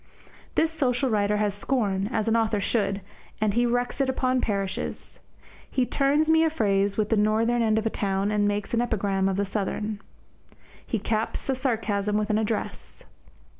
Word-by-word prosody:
This 320 0 +2
social 265 -4 0
writer 210 -1 +2
has 210 -1 +1
scorn, 205 -3 -1
as 220 -3 -1
an 225 - +3
author 220 -2 +1
should, 200 -1 0 0.4
and 215 -1 +1
he 240 +2 +2
wreaks 245 +3 -1
it 270 - +1
upon 255 -1 +1
parishes. 195 -2 -3 0.5
He 255 - +1
turns 285 +4 +2
me 320 0 +5
a 325 - +3
phrase 200 -8 +1
with 215 -1 +1
the 225 - +3
northern 225 +3 +2
end 220 -1 +2
of 220 - 0
a 225 - +1
town 195 0 0
and 205 -1 +2
makes 205 +1 -2
an 235 - +3
epigram 195 -5 0
of 190 - -1
the 200 - +1
southern. 210 +1 -3 0.8
He 230 - -2
caps 220 +2 -2
a 265 - +2
sarcasm 215 -5 0
with 215 0 0
an 210 - +2
address. 220 0 -4
215 Hz, 180 wpm, -26 LUFS, 205-245 Hz, 0.8 s, me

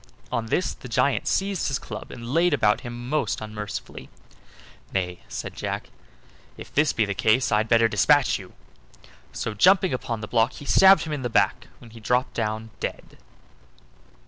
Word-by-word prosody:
On 115 -1 -2
this 180 - 0
the - - -11
giant 125 +4 +1
seized 195 -1 0
his 135 - 0
club 105 -5 -8
and 120 +2 -7
laid 170 -1 +3
about 105 -6 +2
him 120 -1 -7
most 135 -7 -1
unmercifully. 105 -1 -7 0.8
"Nay," 90 -2 -2
said - - -6
Jack, - - -5 0.7
"if - - -11
this 150 +1 +3
be 110 - +1
the 100 - -2
case 110 +5 +2
I'd 110 +1 +1
better 115 -1 +5
dispatch - - +3
you!" - - -12 0.8
so, 115 - -4
jumping 185 - +4
upon 115 -3 -3
the 105 - -5
block, 115 +2 +2
he 145 - -10
stabbed 190 +2 +6
him 155 - -4
in 145 - -3
the 120 - -2
back, - - +1
when 115 - -15
he 115 - -12
dropped 125 +4 0
down 110 +1 -3
dead. - - -6
120 Hz, 170 wpm, -24 LUFS, 110-145 Hz, 0.8 s, stabbed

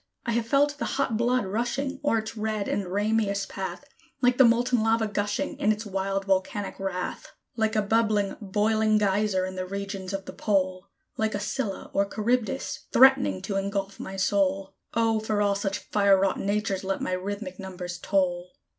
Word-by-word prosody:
I 235 - 0
have 230 0 0
felt 290 +3 +2
the - - -1
hot 270 -5 +1
blood 240 +1 +1
rushing 245 +7 -2
o'er 290 -6 +3
its 220 0 -4
red 215 -1 -2
and 200 -2 -1
rameous 205 0 +1
path, 195 +8 -6 0.3
Like 250 0 +2
the - - +10
molten 240 +1 +3
lava, 225 0 +2
gushing 210 +7 -2
in 210 - +3
its 215 +1 -3
wild, 195 0 -2
volcanic 195 +1 -1
wrath; 185 -2 -4 0.3
Like 220 -1 0
a 215 - +2
bubbling, 210 -2 +1
boiling 215 +2 +2
Geyser, 200 -2 +1
in 185 - -5
the 185 - -2
regions 195 -1 -5
of 195 -1 -4
the - - -8
pole; 185 -2 0 0.3
Like 220 -1 0
a - - -1
Scylla 210 0 -3
or 200 0 +1
Charybdis, 250 +5 -1
threatening 105 - +5
to 195 - -2
ingulf 195 0 -2
my 190 - -6
soul. 195 0 +1 0.2
O, 225 -1 +2
for 215 -1 -1
all 205 -1 +3
such 195 -1 -2
fire 200 -2 +3
wrought 195 0 +1
natures 200 -1 -1
let 195 0 -1
my - - -2
rhythmic 190 0 -4
numbers 180 -2 -6
toll! 180 -1 0
205 Hz, 180 wpm, -26 LUFS, 195-225 Hz, 0.3 s, the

